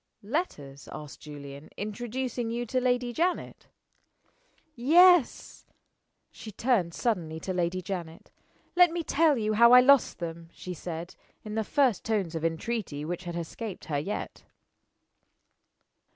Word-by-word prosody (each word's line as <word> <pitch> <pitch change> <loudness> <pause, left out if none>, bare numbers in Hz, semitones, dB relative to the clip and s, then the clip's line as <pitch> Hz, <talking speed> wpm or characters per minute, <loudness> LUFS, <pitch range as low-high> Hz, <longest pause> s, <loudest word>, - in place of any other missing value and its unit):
"Letters," 150 - -4
asked 150 -1 -9
Julian, 140 -1 -10
"introducing 240 +3 -4
you 240 +1 -2
to 255 +3 -1
Lady 245 -1 0
Janet?" 350 +7 -2 1.1
"Yes." 330 +4 +4 0.6
She 215 - -10
turned 200 -6 0
suddenly 170 -9 -1
to 185 - -3
Lady 180 +1 -1
Janet. 170 -3 -6 0.4
"Let 355 0 +7
me 335 0 -3
tell 305 -1 +3
you 215 -1 0
how 235 +3 +6
I 250 - +11
lost 275 0 +4
them," 165 -1 -7
she 180 - -7
said, 170 +1 -6 0.3
in 215 - -7
the 220 0 0
first 260 -3 +1
tones 205 -7 -1
of 165 -1 -4
entreaty 165 -2 -3
which 175 +2 -5
had 175 -1 -5
escaped 180 +5 -6
her 145 -2 -1
yet. 195 +8 -5
210 Hz, 135 wpm, -28 LUFS, 165-250 Hz, 1.1 s, I